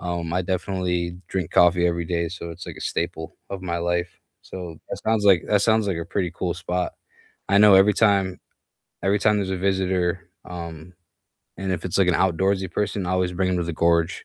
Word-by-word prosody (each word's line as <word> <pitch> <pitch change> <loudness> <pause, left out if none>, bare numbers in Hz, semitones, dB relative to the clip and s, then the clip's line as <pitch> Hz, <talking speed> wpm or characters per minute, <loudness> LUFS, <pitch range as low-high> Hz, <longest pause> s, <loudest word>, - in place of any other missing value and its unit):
um, 85 -2 -3
I 90 - +1
definitely 90 -1 -2
drink 95 -5 -3
coffee 90 0 +4
every 85 -1 -1
day, 85 -1 -1
so 85 -1 -7
it's 85 +2 -9
like - - -8
a - - -10
staple 85 0 -3
of 100 -1 -5
my 85 -2 -3
life. 85 +1 -1 0.3
So 85 -4 -8
that - - -4
sounds 110 -2 +1
like 95 -5 +5
that 105 -1 +3
sounds 110 -1 +3
like 95 - -1
a 85 - -5
pretty 90 0 -1
cool 90 -2 -2
spot. 90 +1 -2 0.6
I 100 +1 +4
know 105 -1 +8
every 95 +2 +6
time 100 -4 +2 0.6
every 100 +2 +2
time 105 +1 +3
there's 100 -2 -2
a 95 - -1
visitor, 90 -2 0 0.2
um, 85 -1 -8 0.6
and 95 -1 -3
if 90 -1 -4
it's, 90 - -1
like, 95 - +4
an 90 - +3
outdoorsy 95 +1 +1
person, 100 -2 -2
I - - -2
always 90 -1 0
bring 95 +1 0
‘em 90 - 0
to - - 0
the 85 - -3
gorge, 85 +1 +1
90 Hz, 210 wpm, -23 LUFS, 85-95 Hz, 0.6 s, know